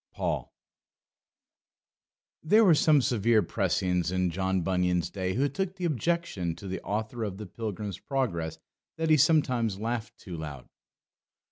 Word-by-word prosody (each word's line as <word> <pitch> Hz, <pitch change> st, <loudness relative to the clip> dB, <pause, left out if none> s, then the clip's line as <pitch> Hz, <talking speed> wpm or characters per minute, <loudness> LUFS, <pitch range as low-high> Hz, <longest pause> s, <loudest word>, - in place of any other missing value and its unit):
Paul. -, -, -2 dB, 1.9 s
There 215 Hz, +8 st, +5 dB
were 180 Hz, -, +7 dB
some 150 Hz, -2 st, +4 dB
severe 115 Hz, -2 st, +3 dB
precisians 90 Hz, -3 st, 0 dB
in 90 Hz, -1 st, +1 dB
John 95 Hz, +1 st, 0 dB
Bunyan's 90 Hz, -2 st, +1 dB
day 95 Hz, -1 st, -2 dB
who 135 Hz, +4 st, +2 dB
took 190 Hz, +6 st, -3 dB
the 180 Hz, -2 st, -3 dB
objection 155 Hz, -, -1 dB
to 90 Hz, +4 st, -9 dB
the 95 Hz, -, -4 dB
author 110 Hz, +3 st, -3 dB
of 100 Hz, -3 st, -4 dB
the 105 Hz, -, -6 dB
Pilgrim's 105 Hz, -1 st, -5 dB
Progress 100 Hz, -, -2 dB, 0.4 s
that 160 Hz, 0 st, 0 dB
he 155 Hz, -, +7 dB
sometimes 130 Hz, -9 st, +2 dB
laughed 115 Hz, +1 st, -3 dB
too 90 Hz, -5 st, -8 dB
loud. 75 Hz, -5 st, -7 dB
105 Hz, 140 wpm, -28 LUFS, 90-140 Hz, 1.9 s, were